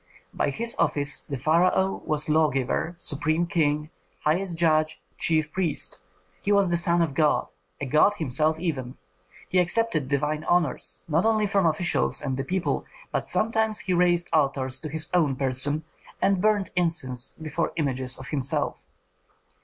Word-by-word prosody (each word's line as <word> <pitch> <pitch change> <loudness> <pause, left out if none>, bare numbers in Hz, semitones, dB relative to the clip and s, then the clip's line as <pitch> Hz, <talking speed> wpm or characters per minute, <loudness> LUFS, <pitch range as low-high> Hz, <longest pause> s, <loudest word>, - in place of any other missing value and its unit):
By - - 0
his 230 - -1
office 145 0 0
the 140 - -6
pharaoh 175 +7 +2
was 150 -1 0
lawgiver, 155 +1 +1
supreme 155 +2 0
king, 150 -2 0 0.3
highest 170 +3 0
judge, 155 -1 +2 0.2
chief 155 -2 +1
priest; 175 - -1 0.4
he 205 - -1
was 200 -2 +4
the 170 - +2
son 170 0 +4
of 160 - -1
a - - -11
god, 150 0 +1 0.3
a - - -3
god 155 +10 +4
himself 155 -1 0
even. 135 -8 -3 0.5
He 185 - +2
accepted 175 - +1
divine 150 +3 -1
honors, 170 -7 0
not 165 +2 +2
only 220 -1 +2
from 195 -3 +2
officials 165 +3 +1
and 135 -3 -2
the 135 - -2
people, 180 +5 -1 0.3
but - - -2
sometimes 220 -1 0
he 185 - -1
raised 175 -1 +3
altars 135 -3 +1
to 155 - -6
his 160 +1 -2
own 155 -7 +3
person, 135 +3 0 0.4
and 195 -2 +2
burnt 210 -2 +2
incense 155 -8 0
before 160 +1 -3
images 130 -5 -1
of 130 - -9
himself. 135 -3 -2
155 Hz, 155 wpm, -25 LUFS, 145-180 Hz, 0.5 s, was